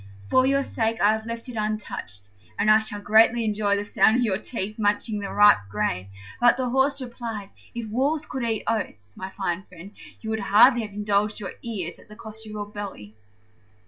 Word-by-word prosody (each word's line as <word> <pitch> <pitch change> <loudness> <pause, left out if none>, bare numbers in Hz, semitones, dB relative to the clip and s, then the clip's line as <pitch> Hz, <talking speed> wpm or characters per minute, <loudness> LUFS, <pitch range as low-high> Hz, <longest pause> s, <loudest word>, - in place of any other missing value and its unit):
For 255 0 +4
your 275 +1 +2
sake 225 -3 -1
I 205 - +5
have 220 +1 -3
left 230 +1 -5
it 250 - -7
untouched, 210 - -5 0.3
and 215 - +4
I 215 - +7
shall 220 -1 -5
greatly 220 +3 +4
enjoy 210 -1 +1
the 205 - -3
sound 210 +1 +4
of 245 - +2
your 200 -4 0
teeth 215 -2 -5
munching 210 +1 0
the 200 -1 -5
ripe 205 - +6
grain." 95 -2 -2 0.3
But 240 0 +5
the 255 -1 -1
Horse 270 +2 +2
replied, 235 -5 -6 0.2
"If 230 -3 -5
wolves 285 +6 0
could 265 - -5
eat 225 -2 -1
oats, 105 - -3
my 190 - -6
fine 190 -2 -3
friend, 185 +2 -12 0.3
you 220 - -5
would 220 - -1
hardly 225 +5 +5
have 210 -2 -7
indulged 210 0 0
your 200 - -5
ears 190 -8 -5
at - - -18
the 210 - -12
cost 220 0 -11
of - - -9
your 210 -1 -4
belly." 200 - -8
215 Hz, 205 wpm, -25 LUFS, 200-230 Hz, 0.3 s, I